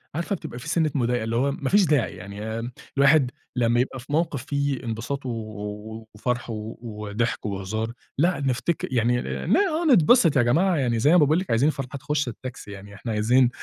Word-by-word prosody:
عارفة 170 +4 -1
بتبقى 125 -7 -8
في 145 - -9
سِنّة 160 -2 +1
مضايقة، 120 -2 +1
اللي 115 +1 -2
هو 140 +3 +2
ما 140 -1 -3
فيش 200 -2 +5
داعي. 145 -10 +1
يعني 105 +5 -5 0.3
الواحد 140 -2 +5 0.2
لمّا 120 -1 +2
يبقى 130 +1 -1
في 120 - -12
موقف 150 -4 0
فيه 140 -3 -1
انبساط 120 +5 -4
و - - -2
و 110 0 -7
وفَرَح 120 +2 -2
و 110 0 -5
وضحك 105 0 -3
وهزار، 105 +3 -3 0.3
لأ 170 +1 +2
نفتكر 135 +5 -1
يعني 120 +1 +2
آآ - - -4
لا 225 - +4
آه، 345 -4 +1
نتبسط 175 - +5
يا - - +6
جماعة. 170 +10 +3
يعني 120 -5 +1
زي 145 +7 +4
ما 180 - +7
باقول 155 +2 +4
لِك، 190 - -6
عايزين 130 +7 +4
الفرحة 135 -1 -4
تخُش 150 0 -1
التاكسي، 120 -2 -7
يعني 100 +1 -10
إحنا 115 +2 -5
عايزين 120 +4 +3
125 Hz, 200 wpm, -24 LUFS, 110-150 Hz, 0.3 s, ما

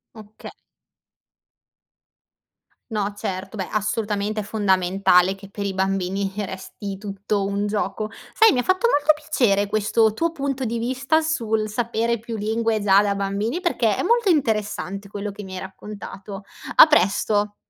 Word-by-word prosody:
Oka 215 -1 -11 2.4
No 205 -1 -1
certo, 195 +1 -5
beh, 190 - -3
assolutamente 215 0 -1
è - - -6
fondamentale 190 -2 +3
che 195 0 -13
per 200 0 -5
i 195 - -2
bambini 195 +1 -1
resti 195 0 -6
tutto 200 0 -2
un 200 +1 -1
gioco. 215 +1 -2 0.2
Sai, 445 -6 +5
mi 250 - +1
ha - - +1
fatto 370 - +2
molto 300 -7 +4
piacere 240 -10 +1
questo 215 +1 +2
tuo 330 +8 0
punto 275 -4 -3
di 235 0 -2
vista, 265 +7 +1
sul 225 -9 -1
sapere 235 +1 -1
più 230 0 -6
lingue 220 +1 0
già 195 0 +6
da 200 -1 0
bambini, 200 - -2
perché - - +1
è - - -2
molto 470 -3 +3
interessante 210 - -1
quello 205 0 -5
che 205 - -9
mi 190 0 -9
hai - - -4
raccontato. 200 +1 -9 0.3
A - - +11
presto. 205 - +2
210 Hz, 150 wpm, -23 LUFS, 200-230 Hz, 2.4 s, A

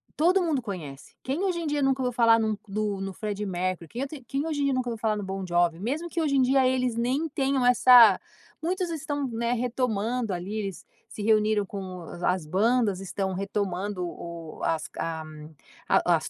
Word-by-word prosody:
todo 360 +4 +3
mundo 300 -6 0
conhece, 160 -10 -8
quem 285 +9 -2
hoje 360 -3 0
em 330 - -4
dia 295 0 0
eu - - +1
nunca 270 0 +2
ouviu 250 -1 -1
falar 230 -1 +5
em - - +1
um 215 -1 0
nu 210 +2 -2
no 195 - -7
no 195 -1 -4
Freddie 210 0 -4
Mercury? 180 -2 -2
Quem 245 - -5
eu - - -3
te 275 -3 -10
quem 280 +3 -2
hoje 300 -3 -2
em - - +2
dia 275 - +2
nunca 245 -2 -1
viu 230 - -4
falar 215 -1 0
no 205 - -4
Bom 190 0 -4
Jovi? 175 -1 +1
Mesmo 290 - -2
que 335 - -2
hoje 285 -3 +1
em - - +5
dia 260 0 +4
eles 255 -2 +1
nem 260 +7 0
tenham 270 -3 0
essa 245 -4 +8 0.4
muitos 360 0 -1
estão, 290 -3 -2
né, 235 +1 -1
retomando 240 -2 -1
ali. 180 +4 -5
Eles 195 -4 -5 0.2
se 210 - -8
reuniram 215 -1 +3
com 185 -2 -7
a 175 +2 -1
as 180 -5 -5
bandas, 205 +3 +2
estão 190 0 -3
retomando 195 -1 -2
o 170 -2 -8
as 160 -2 0
a 160 -1 -3 0.7
a - - +4
as - - -6
225 Hz, 215 wpm, -27 LUFS, 190-265 Hz, 0.7 s, essa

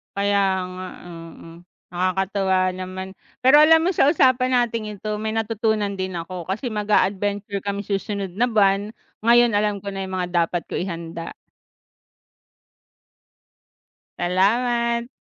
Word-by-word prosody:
Kaya 200 0 +1 0.4
nga, 185 0 -6 0.2
oo, 165 -1 -11 0.4
nakakatuwa 190 +1 0 0.2
naman. 185 +1 -6 0.3
Pero 280 +4 +7
alam 320 +1 +7
mo 345 +3 +1
sa 285 - +4
usapan 255 -4 +3
nating 230 -4 0
ito 215 -1 -3
may 215 +1 -3
natutunan 220 -2 -1
din 185 -1 -4
ako, 175 +1 -6
kasi 235 +6 -3
mag-a-adventure 205 -1 0
kami 200 0 -3
susunod 195 -2 -3
na 235 - +1
buwan, 200 0 +2 0.3
ngayon 235 -1 +5
alam 205 -1 +1
ko 200 - -12
na 195 0 -4
'yung 190 0 -5
mga 180 - -1 0.2
dapat 175 0 -4
ko - - -6
ihanda. 170 -2 -5 2.9
Salamat! 235 +6 +1
205 Hz, 125 wpm, -22 LUFS, 190-230 Hz, 2.9 s, Pero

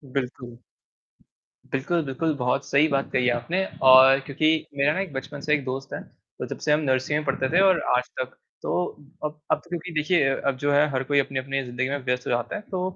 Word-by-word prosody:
बिल्कुल। 125 -2 -4 1.1
बिल्कुल, 155 +6 0
बिल्कुल 150 +4 -1
बहुत 125 +1 0
सही 140 +3 +3
बात 140 -2 -1
कही 125 - +1
है 125 - +3
आपने 170 +11 -1 0.3
और 130 +1 +8
क्योंकि 145 +2 0 0.3
मेरा 140 +2 +3
ना 185 - -2
एक 195 -4 -5
बचपन 140 +2 -6
से 150 0 0
एक 145 -3 +1
दोस्त 135 +1 -5
है, - - -4
तो - - -11
जब - - -6
से 150 - 0
हम 150 - +4
नर्सरी 130 -1 0
में 150 - -2
पढ़ते 135 -1 -1
थे 175 - +3
और 190 -2 +5 0.2
आज 125 +1 -2
तक। 130 0 -4 0.3
तो - - -2 0.5
अब 150 0 -5
अब - - +4
तो 175 - -21
क्योंकि 175 0 -5
देखिए 155 +2 +2
अ 135 - +1
अब 135 -2 +1
जो 145 +2 0
है 145 +1 +4
हर 135 -1 -1
कोई 145 +1 +2
अपनी-अपनी 135 0 -2
ज़िंदगी 125 +1 -3
में 140 - -1
व्यस्त 125 -1 -1
हो - - -1
जाता 120 0 -1
है - - -4
तो 185 -1 -2
140 Hz, 230 wpm, -24 LUFS, 130-150 Hz, 1.1 s, और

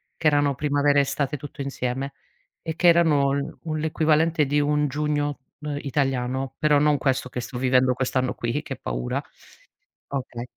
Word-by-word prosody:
che 160 - 0
erano 145 -1 +3
primavera, 145 0 +2
estate 140 +1 0
tutto 145 +1 -8
insieme, 135 0 -3 0.5
e 160 -1 -4
che 175 - +3
erano 145 -5 +3
un 155 -1 -3
l'equivalente 160 0 +2
di 145 +2 +1
un 150 0 +2
giugno, 145 0 -1 0.2
uhm, 150 -1 -4
italiano; 135 -1 -1
però 150 -1 +4
non 150 0 +3
questo 130 -2 0
che 125 - -5
sto 125 +1 -6
vivendo 130 0 +3
quest'anno 130 0 0
qui, 120 +5 -2
che 140 -3 -6
paura - - -3 0.9
okay. 125 -3 -5
140 Hz, 155 wpm, -24 LUFS, 130-150 Hz, 0.9 s, però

